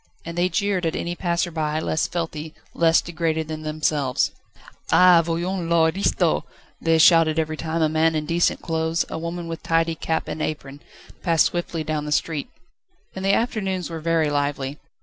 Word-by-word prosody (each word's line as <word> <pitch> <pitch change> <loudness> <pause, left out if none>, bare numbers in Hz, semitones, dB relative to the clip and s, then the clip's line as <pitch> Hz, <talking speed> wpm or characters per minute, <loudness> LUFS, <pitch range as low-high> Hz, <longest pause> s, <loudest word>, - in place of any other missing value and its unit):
And 170 0 -6
they 175 +1 +1
jeered 195 -4 0
at 160 - -2
any 175 - -3
passer 175 0 -1
by 155 -1 -1
less 160 0 0
filthy, 160 -2 -4 0.2
less 165 -1 +4
degraded 160 -2 -2
than 155 0 -5
themselves. 155 -4 0 0.6
"Ah! 180 -2 +7
voyons 170 +1 -2
l'aristo!" 170 +3 +2 0.4
they 165 -1 +3
shouted 160 -1 +5
every 155 -1 0
time 160 +1 -2
a - - +4
man 160 +1 +2
in 155 -1 -1
decent 170 +2 +1
clothes, 160 0 0
a - - -4
woman 170 +1 -5
with 165 0 -6
tidy 165 0 +1
cap 160 0 -2
and 155 - -4
apron, 145 -2 -4 0.4
passed 165 -4 +3
swiftly 175 -2 -2
down 155 -1 -2
the 150 - -5
street. 150 -1 -1 0.7
And 190 - -5
the 195 +1 +3
afternoons 195 -7 -2
were 165 - -4
very 160 -1 +1
lively. 145 -1 -2
165 Hz, 170 wpm, -23 LUFS, 155-170 Hz, 0.7 s, Ah